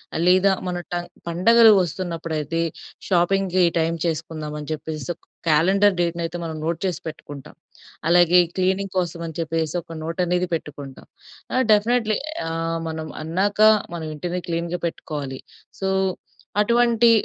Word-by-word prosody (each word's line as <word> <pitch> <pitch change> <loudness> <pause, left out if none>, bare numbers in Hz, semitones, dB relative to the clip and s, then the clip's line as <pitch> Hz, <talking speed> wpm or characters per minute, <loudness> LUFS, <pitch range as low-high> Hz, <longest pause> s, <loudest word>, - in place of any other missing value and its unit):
ఆ! - - 0
లేదా 185 +2 +5 0.2
మన 180 -1 -2 0.2
టంగ్ 175 0 -3 0.2
పండగలు 225 +7 +6
వస్తున్నప్పుడైతే 165 -2 -3 0.5
షాపింగ్‌కి 185 +1 +2
ఈ - - +3
టైమ్ 165 +1 +1
చేసుకుందామని 155 -2 -4
చెప్పేసి 155 0 -6
ఒక - - -47 0.3
క్యాలెండర్ 190 +6 +4
డేట్‌నయితే 170 0 -1
మనం 160 -1 -4
నోట్ 165 0 -1
చేసి 180 -3 -1
పెట్టుకుంటాం. 145 -3 -9 0.5
అలాగే 175 +1 +6 0.2
క్లీనింగ్ 190 +1 0
కోసం 170 -2 -1
అని 160 -2 -7
చెప్పేసి 165 0 -1
ఒక 165 - -11
నోట్ 165 +2 -5
అనేది 180 +1 0
పెట్టుకుంటాం. 145 -4 -6 0.5
ఆ! - - 0 0.2
డెఫినెట్లీ 220 +1 +3 0.3
ఆహ్, 165 0 -2
మనం 160 0 -5 0.2
అన్నాక 190 +6 -1 0.4
మన 170 - -5
ఇంటిని 175 +4 -4
క్లీన్‌గా 170 +1 -2
పెట్టుకోవాలి. 145 -5 -6 0.4
సో, 190 - -1 0.7
అటువంటి 235 0 +4
170 Hz, 130 wpm, -23 LUFS, 160-185 Hz, 0.7 s, పండగలు